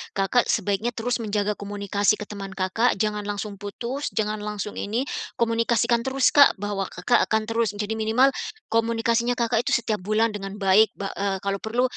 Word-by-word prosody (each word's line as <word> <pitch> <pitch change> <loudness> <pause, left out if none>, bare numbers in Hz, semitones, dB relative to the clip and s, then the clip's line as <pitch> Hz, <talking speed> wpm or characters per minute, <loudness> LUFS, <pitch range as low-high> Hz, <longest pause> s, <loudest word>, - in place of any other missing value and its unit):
Kakak 200 +5 +2
sebaiknya 210 +4 0
terus 245 +2 -1
menjaga 210 -2 -1
komunikasi 205 0 0
ke 210 - -7
teman 195 -2 -8
Kakak, 190 +6 +1
jangan 210 0 -2
langsung 205 -1 -4
putus, 235 +7 -4
jangan 215 0 -1
langsung 210 0 -5
ini, 225 +5 -1 0.3
komunikasikan 235 +1 +1
terus, 265 0 +3
Kak, 285 -1 +7
bahwa 200 -1 -3
Kakak 180 +8 +1
akan 220 0 +1
terus 225 -2 -1
kadi 215 +2 -3
minimal 230 +5 +3 0.4
komunikasinya 230 +1 +1
Kakak 235 0 0
itu 280 - +3
setiap 220 -2 -1
bulan 215 +4 +1
dengan 195 -1 -6
baik. 205 +2 +4
Ba 195 -1 -4
eee, 195 -1 0
kalau 200 0 -1
perlu 230 +5 -1
215 Hz, 170 wpm, -24 LUFS, 200-230 Hz, 0.4 s, Kak